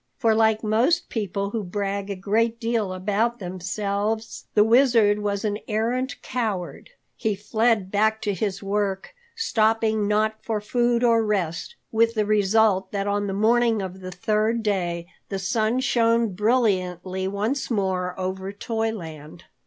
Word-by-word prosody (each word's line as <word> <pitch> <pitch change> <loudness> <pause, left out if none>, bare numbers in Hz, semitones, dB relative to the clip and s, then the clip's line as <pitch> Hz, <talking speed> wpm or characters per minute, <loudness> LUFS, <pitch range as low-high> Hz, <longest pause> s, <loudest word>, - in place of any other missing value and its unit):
For 225 -3 +3
like 220 0 +3
most 240 +11 +2
people 200 -2 -2
who 225 -1 -2
brag 200 +1 -3
a 200 - -2
great 225 +4 0
deal 225 -4 -1
about 210 +6 0
themselves, 200 +4 -3
the 210 - +7
Wizard 225 -3 +4
was 205 0 -2
an 205 0 -1
arrant 240 +5 -1
coward. 215 - -3 0.3
He 215 -3 -1
fled 215 -1 +1
back 220 +1 +2
to 205 -2 0
his 195 +1 -3
work, 195 - -2 0.2
stopping 220 - +1
not 215 +1 +1
for 220 -2 -1
food 240 +3 +1
or 230 -2 +4
rest, 200 - -2 0.2
with 230 +1 +2
the 215 -1 +1
result 205 -2 +2
that 200 -1 -2
on 205 0 0
the 195 - -2
morning 225 +2 +3
of 190 0 -7
the 185 -1 -7
third 215 +5 0
day 175 -5 -1 0.2
the 195 - -2
sun 220 +5 0
shone 230 -3 +2
brilliantly 190 -4 0
once 210 +8 -2
more 190 -4 -1
over 190 +1 -3
Toyland. 200 -9 -5
210 Hz, 145 wpm, -24 LUFS, 195-225 Hz, 0.3 s, the